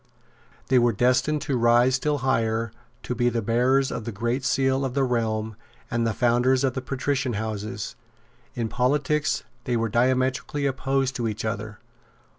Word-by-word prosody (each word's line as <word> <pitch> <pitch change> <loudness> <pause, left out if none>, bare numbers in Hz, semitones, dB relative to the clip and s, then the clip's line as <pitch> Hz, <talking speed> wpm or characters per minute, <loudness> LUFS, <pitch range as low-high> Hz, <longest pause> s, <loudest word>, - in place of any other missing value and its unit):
They 130 -1 +5
were 120 -1 +3
destined 125 +7 +2
to 140 - -1
rise 120 +2 +4
still 145 +3 +1
higher, 115 -3 +1 0.3
to - - -3
be 120 0 +2
the 115 -2 -2
bearers 125 +5 +2
of - - -4
the 115 - -4
great 120 +5 -2
seal 135 0 +1
of 130 -1 -3
the 140 - +2
realm, 110 -3 -1 0.4
and 115 -1 +1
the 110 - 0
founders 125 +2 +2
of 130 -2 +1
patrician 130 0 -2
houses. 110 +1 -4 0.6
In 115 -2 -1
politics 145 +5 0 0.2
they 120 -1 0
were 115 0 0
diametrically 130 +4 +1
opposed 135 0 0
to 120 -2 -1
each 110 0 -4
other. 110 -1 -4
125 Hz, 160 wpm, -25 LUFS, 115-130 Hz, 0.6 s, They